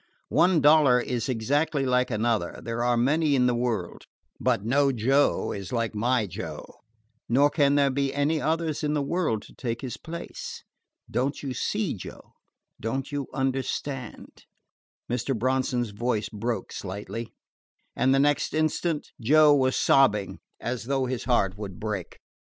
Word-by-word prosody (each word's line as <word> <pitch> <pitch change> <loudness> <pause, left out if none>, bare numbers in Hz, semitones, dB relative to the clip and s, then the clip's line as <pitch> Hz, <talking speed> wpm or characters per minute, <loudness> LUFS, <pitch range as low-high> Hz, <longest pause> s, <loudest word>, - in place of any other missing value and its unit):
One 175 -3 +4
dollar 145 -4 +6
is 125 +1 -2
exactly 135 +5 0
like 125 0 +2
another 110 -5 -1
there 115 0 -2
are 120 0 +2
many 145 +4 +2
in 125 -2 +3
the 125 - +3
world: 120 -7 -2 0.3
but 100 - +1
no 140 +4 +3
Joe 135 +4 +2
is 100 -2 -6
like 115 -3 -1
my 120 +2 +1
Joe, 90 - -8 0.5
nor 140 +5 +4
can 145 -2 +3
there 140 -1 +3
be 140 0 0
any 145 +2 0
others 160 -1 -1
in 150 0 0
the 145 - +1
world 140 - -1
to - - -15
take 115 -3 -4
his 130 -3 -5
place. 170 +1 -7 0.4
Don't 135 +4 -2
you 135 -2 -3
see, 205 - -1
Joe? 95 - -10 0.5
Don't 130 +6 -3
you 145 -2 -3
understand?" 135 -1 -4 0.6
Mr. 125 +1 -1
Bronson's 125 -1 0
voice 110 0 -1
broke 110 -1 -3
slightly, 105 +4 -6 0.6
and 130 - +2
the 135 - +4
next 145 +2 +2
instant 155 0 -1
Joe 150 +5 +6
was 130 -2 +2
sobbing 105 -8 +3 0.2
as 120 -2 -4
though 135 0 0
his 125 -2 -3
heart 100 -6 +1
would 95 -4 -7
break. 105 -5 -4
130 Hz, 150 wpm, -26 LUFS, 115-145 Hz, 0.6 s, dollar